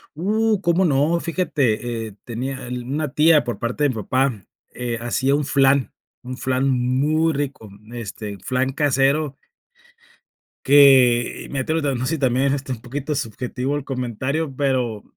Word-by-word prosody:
Uh, 215 +5 +1
cómo 175 0 +2
no. 155 +1 +2
Fíjate, 120 -9 -1
eh, 100 - -12
tenía, 125 +2 -5
el 125 0 -5
una 140 +2 -3
tía 155 -1 +5
por 120 - -4
parte 120 +5 -2
de 145 - +4
mi 130 - -3
papá, 120 -1 -1 0.3
eh, 120 -1 -4
hacía 130 +3 0
un 145 0 -1
flan, 135 -1 +2 0.3
un 130 0 -7
flan 130 +2 0
muy 135 +6 +1
rico, 140 -6 -4 0.2
este, 105 -3 -6
flan 130 +6 -1
casero. 140 0 +1 1.3
Que, 130 -4 +5
y - - -12
me 135 - -3
atrevo, 155 +5 -1
tamb 135 -4 -1
si 160 +3 -1
también 130 0 +2
es, 135 - +2
este, 135 -1 -4
un 120 -3 -5
poquito 140 +5 -4
subjetivo 125 +3 -3
el 145 - -5
comentario, 135 +3 -3
pero, 130 -6 -1
135 Hz, 160 wpm, -21 LUFS, 125-145 Hz, 1.3 s, tía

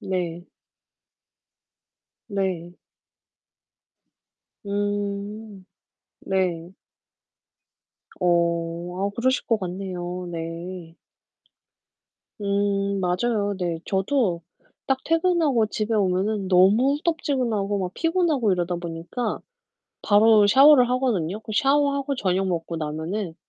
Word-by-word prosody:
네. 175 -2 -3 1.8
네. 185 -4 -3 1.9
음. 205 0 -4 0.6
네. 180 -3 -1 1.5
어 170 -1 +1 0.3
아 - - -2
그러실 260 +5 0
것 225 - +2
같네요. 180 -1 -5
네. 165 +1 -7 1.5
음 200 0 0
맞아요. 205 +3 0
네, 175 -3 -2
저도 195 - 0 0.4
딱 270 -1 +1
퇴근하고 330 -7 +2
집에 215 +1 -2
오면은 195 0 0
너무 200 +9 +5
후덥지근하고 250 - -1
막 185 -1 -4
피곤하고 330 - +1
이러다 175 -1 -1
보니까 170 +7 -4 0.6
바로 210 0 +5
샤워를 265 +2 +7
하거든요. 215 -8 0
그 220 - -8
샤워하고 280 +1 +2
저녁 190 -4 0
먹고 170 -2 -3
나면은 160 +4 -4
200 Hz, 180 characters per minute, -24 LUFS, 180-235 Hz, 1.9 s, 샤워를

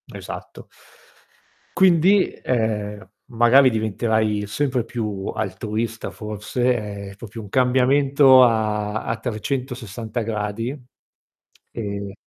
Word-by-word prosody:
Esatto. - - -9 1.1
Quindi, 185 +1 +5
ehm, 105 -4 -2 0.2
magari 125 +2 +5
diventerai 110 -1 0
sempre 125 +4 -1
più 105 -4 -4
altruista, 110 +2 -3
forse, 105 0 -3
è - - -14
proprio 110 +2 -9
un 105 - -10
cambiamento 130 +2 +5
a 110 -2 0
a 115 - -2
360 120 -1 -4
gradi. 110 +4 -3 0.9
E 100 -3 -5
110 Hz, 90 wpm, -22 LUFS, 105-125 Hz, 1.1 s, Quindi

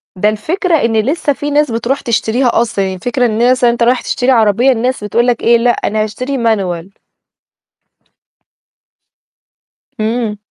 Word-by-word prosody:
ده 205 +3 +1
الفكرة 330 - -1
إن 230 -7 +1
لسّه 290 +5 0
في 290 +2 -5
ناس 295 -3 +1
بتروح 235 +4 -2
تشتريها 235 +1 0
أصلًا، 220 -4 -1
يعني 190 0 -3
الفكرة 245 +6 -1
الناس 240 +3 +1
يعني 240 -1 +4
أنت 235 - -1
راح 245 +1 +2
تشتري 255 +2 0
عربية، 230 +2 +3
الناس 250 -1 -1
بتقول 235 +4 0
لك 240 -2 0
إيه: 235 0 +5
"لأ 240 +1 +1
أنا 215 -2 0
هاشتري 255 +6 -4
Manual." 195 -4 -2 3.0
إمم. 220 -1 -2
235 Hz, 150 wpm, -14 LUFS, 215-255 Hz, 3.0 s, إيه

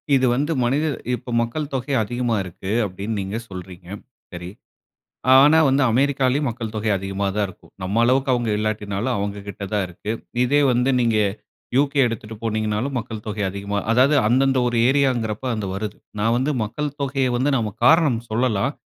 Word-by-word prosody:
இது 130 -1 +3
வந்து 145 +5 0
மனிதர் 140 +3 +1 0.2
இப்போ 120 +1 -9
மக்கள் 140 +6 -3
தொகை 135 +2 -2
அதிகமா 120 +1 -1
இருக்கு. 95 +2 -7
அப்படின்னு 100 +4 -4
நீங்க 95 +4 -4
சொல்றீங்க 90 -1 -10 0.5
சரி. 85 0 -6 0.9
ஆனா 145 +4 +7
வந்து 135 +1 +3
அமெரிக்காவிலயும் 135 +2 +2
மக்கள் 115 -1 -5
தொகை 110 0 -1
அதிகமா 95 +1 -3
தான் 105 -1 +1
இருக்கும். 90 - -16
நம்ம 100 +5 0
அளவுக்கு 130 +3 +2
அவங்க 120 -2 0
இல்லாட்டினாலும் 110 +2 -2
அவங்ககிட்ட 100 0 -5
தான் 100 -2 +1
இருக்கு. 90 +5 -7 0.3
இதே 145 +4 +3
வந்து 125 +2 +2
நீங்க 115 -2 +2 0.6
யு.கே. 140 +1 +2
எடுத்துட்டு 110 -1 -5
போனீங்கன்னாலும் 110 +3 -1
மக்கள் 110 -2 -6
தொகை 105 -1 -3
அதிகமா 100 +1 -3
அதாவது 130 +6 +4
அந்தந்த 130 +3 +3
ஒரு 120 -1 0
ஏரியாங்கிற 130 -5 +2
போது 130 -2 -2
அது 105 -2 -3
வருது. 105 +1 -4 0.2
நான் 115 +3 +2
வந்து 130 +4 0
மக்கள் 145 +6 -4
தொகைய 135 -1 0
வந்து 135 +4 +1
நாம 110 -4 -1
காரணம் 150 -8 +4
சொல்லலாம். 120 +2 +1
115 Hz, 160 wpm, -22 LUFS, 105-135 Hz, 0.9 s, ஆனா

